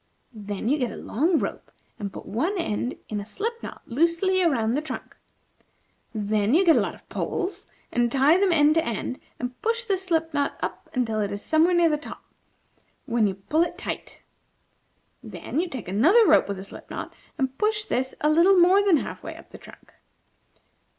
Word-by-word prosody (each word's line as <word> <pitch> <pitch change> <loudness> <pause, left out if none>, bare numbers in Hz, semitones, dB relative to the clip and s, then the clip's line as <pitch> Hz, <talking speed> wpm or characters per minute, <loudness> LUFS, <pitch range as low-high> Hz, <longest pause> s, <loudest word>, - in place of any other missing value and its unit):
Then 205 -1 -5
you 290 +4 +2
get 245 -3 -1
a - - -8
long 320 - +1
rope, - - -4 0.3
and 200 -2 -4
put - - -9
one 325 - -1
end 245 - -2
in 210 - -3
a - - -5
slipknot 455 - -5
loosely 335 +8 +2
around 240 -10 +2
the 290 - 0
trunk. 310 - -7 1.0
Then 210 +2 +1
you 380 +3 +4
get 330 - +6
a - - +4
lot - - -2
of - - -21
poles, 390 0 -3 0.2
and 240 -1 +1
tie 280 +7 +4
them 390 -2 +3
end 300 -2 +5
to 325 0 +2
end, 235 +2 -3 0.2
and 250 0 -6
push 460 +2 0
this 390 -5 -1
slip 325 -3 0
knot 285 -1 -1
up - - -5
until 225 -4 0
it 205 -1 -2
is 200 0 -5
somewhere 325 +3 +3
near 345 -1 +5
the 300 - +1
top, - - -10 0.8
when 230 -4 +2
you 190 - -2
pull 295 - 0
it 340 - -1
tight. - - -6 1.0
Then 300 - -5
you 355 +1 -1
take 255 - -6
another 315 - +5
rope - - +5
with 200 -1 -4
a 190 - -7
slip 195 - -11
knot, - - -6 0.2
and 265 -2 -1
push 425 0 +1
this 260 -5 -2
a 300 - +3
little 350 +5 +5
more 365 +3 +6
than 390 -5 +4
half - - -5
way - - -7
up - - -15
the - - -11
trunk. - - -16
300 Hz, 195 wpm, -25 LUFS, 230-355 Hz, 1.0 s, get